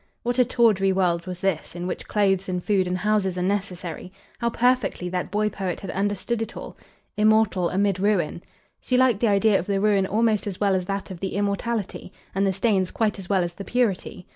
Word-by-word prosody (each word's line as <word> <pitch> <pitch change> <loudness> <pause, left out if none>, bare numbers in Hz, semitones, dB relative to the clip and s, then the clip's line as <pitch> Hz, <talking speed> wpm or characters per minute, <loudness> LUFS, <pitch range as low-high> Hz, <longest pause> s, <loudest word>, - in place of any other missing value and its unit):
'" - - -47
What 245 +1 -1
a 250 - +6
tawdry 220 -6 +3
world 180 -2 0
was 180 -1 -6
this, 185 -4 -1
in 175 0 -4
which 180 - -4
clothes 195 -2 +1
and 180 -1 -2
food 195 -3 +1
and 180 0 -1
houses 190 -2 0
are 180 - -1
necessary! 185 -3 -3 0.3
How 235 - +1
perfectly 245 -6 +1
that 180 0 -3
boy 210 +2 +1
poet 190 -4 -4
had 195 - -5
understood 205 +4 -1
it 225 +1 -5
all! - - -8 0.4
"'Immortal 215 -4 +3
amid 195 -1 +1
ruin!'" 190 -5 0 0.4
She 255 - 0
liked 250 -5 +4
the 235 - +2
idea 205 0 +4
of 175 - -6
the 200 -1 +1
ruin 200 -2 +2
almost 215 0 +1
as 190 -3 -5
well 200 -2 +2
as 185 -1 0
that 195 0 -4
of 180 - -7
the 190 0 -4
immortality, 205 0 -2 0.2
and 195 +1 +1
the - - +2
stains 190 -3 +1
quite 215 -2 -1
as 185 - -9
well 190 -3 +3
as 175 0 -4
the 195 - -8
purity. 205 -6 -1
195 Hz, 215 wpm, -24 LUFS, 185-215 Hz, 0.4 s, a